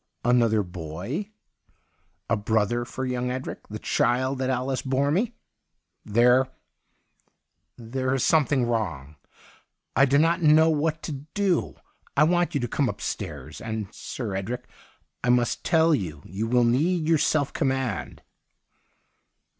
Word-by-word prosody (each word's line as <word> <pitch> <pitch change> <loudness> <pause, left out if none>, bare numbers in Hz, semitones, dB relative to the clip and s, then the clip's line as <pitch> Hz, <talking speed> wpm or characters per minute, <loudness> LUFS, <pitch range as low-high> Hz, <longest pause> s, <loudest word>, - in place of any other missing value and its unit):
' - - -19
Another 115 -3 +3
boy 90 - -5 0.5
— - - -44 0.3
a 115 - +2
brother 110 +2 0
for 130 +2 -5
young 125 -1 -2
Edric, 130 +1 -5
the - - -6
child 130 +2 0
that 130 0 -1
Alice 130 0 -1
bore 135 +2 0
me 225 +8 0 0.2
?' - - -53
' - - -53
There 125 +2 +5 0.7
— - - -46
there 130 +3 -3
is 130 - 0
something 145 -5 +3
wrong. 85 - -3 0.8
I 135 - +6
do 140 +1 +3
not 165 +3 +3
know 160 +1 +6
what 155 +1 -1
to - - -4 0.2
do. 195 -5 +1 0.4
I 145 - +7
want 175 +1 +2
you - - +2
to 120 - -1
come 135 +2 0
upstairs. 80 -8 -5
And, 110 -3 -5
Sir 110 -7 -5
Edric, 110 +6 -4 0.6
I 120 - +1
must 120 -1 +2
tell 160 0 +4
you, 80 - -3
you 100 +5 -3
will 120 +1 +3
need 155 +8 +2
your 160 -2 +4
self 145 -2 +1
command.' 130 -5 -2
125 Hz, 150 wpm, -25 LUFS, 110-150 Hz, 0.8 s, I